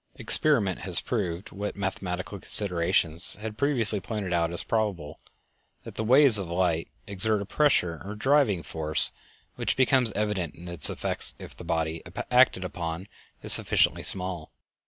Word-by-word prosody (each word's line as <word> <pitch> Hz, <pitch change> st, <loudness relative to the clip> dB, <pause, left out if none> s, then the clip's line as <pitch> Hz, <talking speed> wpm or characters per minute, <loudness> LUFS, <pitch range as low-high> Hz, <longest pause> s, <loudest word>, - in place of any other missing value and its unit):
Experiment 115 Hz, -, 0 dB
has 90 Hz, -3 st, +5 dB
proved, 95 Hz, -5 st, -5 dB
what 105 Hz, +1 st, -6 dB
mathematical 95 Hz, 0 st, -6 dB
considerations 90 Hz, -3 st, +2 dB
had 105 Hz, 0 st, -8 dB
previously 115 Hz, -6 st, +5 dB
pointed 100 Hz, -3 st, -6 dB
out 85 Hz, -1 st, 0 dB
as 85 Hz, -, +3 dB
probable, 95 Hz, -9 st, -4 dB, 0.6 s
that -, -, -11 dB
the 110 Hz, -, -5 dB
waves 130 Hz, -1 st, +5 dB
of 95 Hz, -, -6 dB
light 85 Hz, -2 st, -2 dB, 0.2 s
exert 105 Hz, +2 st, -2 dB
a 100 Hz, -, -6 dB
pressure 90 Hz, -, -1 dB
or 100 Hz, +2 st, -8 dB
driving 120 Hz, -, 0 dB
force, 75 Hz, 0 st, +2 dB, 0.5 s
which -, -, -3 dB
becomes 130 Hz, -3 st, +2 dB
evident 100 Hz, -6 st, -4 dB
in 85 Hz, +2 st, -13 dB
its 85 Hz, -3 st, +3 dB
effects -, -, -2 dB
if -, -, -13 dB
the -, -, -12 dB
body 80 Hz, 0 st, -3 dB, 0.3 s
acted -, -, +2 dB
upon 85 Hz, +2 st, -7 dB, 0.4 s
is -, -, +7 dB
sufficiently -, -, +3 dB
small. 90 Hz, -4 st, -2 dB
95 Hz, 150 wpm, -25 LUFS, 85-110 Hz, 0.6 s, is